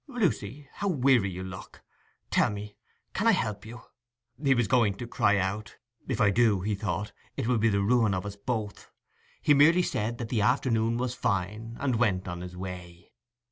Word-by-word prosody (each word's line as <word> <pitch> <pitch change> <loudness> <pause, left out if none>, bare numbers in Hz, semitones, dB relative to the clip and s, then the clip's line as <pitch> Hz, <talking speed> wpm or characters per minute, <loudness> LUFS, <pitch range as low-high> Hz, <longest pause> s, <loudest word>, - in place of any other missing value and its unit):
'Lucy, 150 - -2
how 200 - -3
weary 130 - +3
you 95 0 -6
look! 95 0 -10 0.5
tell - - +3
me, 105 0 -7 0.4
can 210 +4 0
I 225 - +6
help 105 - -2
you?' 120 +2 -10 0.6
he 135 -2 +4
was 120 -3 +1
going 110 -3 +3
to 120 - -6
cry 105 -3 +2
out.—'If 110 +5 -5
I 100 - +4
do,' 110 -3 +3
he 105 +3 -1
thought, 100 0 -3 0.3
'it - - -1
will 120 -1 +2
be 115 +1 +3
the 100 -1 +1
ruin 110 -2 +3
of 95 - -3
us 100 -1 -5
both!' 105 0 -4 0.5
He 150 - +5
merely 165 +5 +5
said 115 -5 -2
that 115 -1 -5
the 115 -4 0
afternoon 115 -1 +2
was 125 0 -2
fine, 105 +1 -2
and 130 -4 0
went 95 -6 +1
on 90 0 -5
his 90 0 -8
way. 90 -2 -8
110 Hz, 185 wpm, -28 LUFS, 100-125 Hz, 0.6 s, I